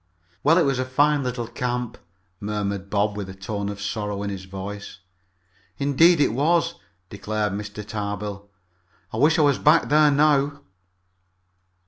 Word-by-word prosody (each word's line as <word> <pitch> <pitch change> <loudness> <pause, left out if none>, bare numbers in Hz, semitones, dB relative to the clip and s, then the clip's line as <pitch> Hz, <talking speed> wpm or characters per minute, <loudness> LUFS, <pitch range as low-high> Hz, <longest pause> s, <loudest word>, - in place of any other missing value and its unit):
"Well, 160 +4 +4
it 175 - +5
was 135 -3 0
a - - +1
fine 145 +3 +2
little 125 -2 -3
camp," 120 0 -3 0.4
murmured 100 -2 -3
Bob, 105 0 0
with 100 -2 -5
a 95 - -8
tone 100 +1 -4
of 100 -1 -6
sorrow 105 0 -3
in 100 - -3
his 95 -1 -7
voice. 100 +2 -7 0.8
"Indeed 150 +4 +4
it 145 - +3
was," 165 +5 +2 0.4
declared 105 0 -2
Mr. 105 +1 -6
Tarbill. 100 -1 -5 0.6
"I - - -3
wish 155 +7 +4
I 155 - +4
was 145 -2 +3
back 155 +3 +4
there 150 +1 +5
now." 145 0 +2
110 Hz, 150 wpm, -23 LUFS, 100-145 Hz, 0.8 s, it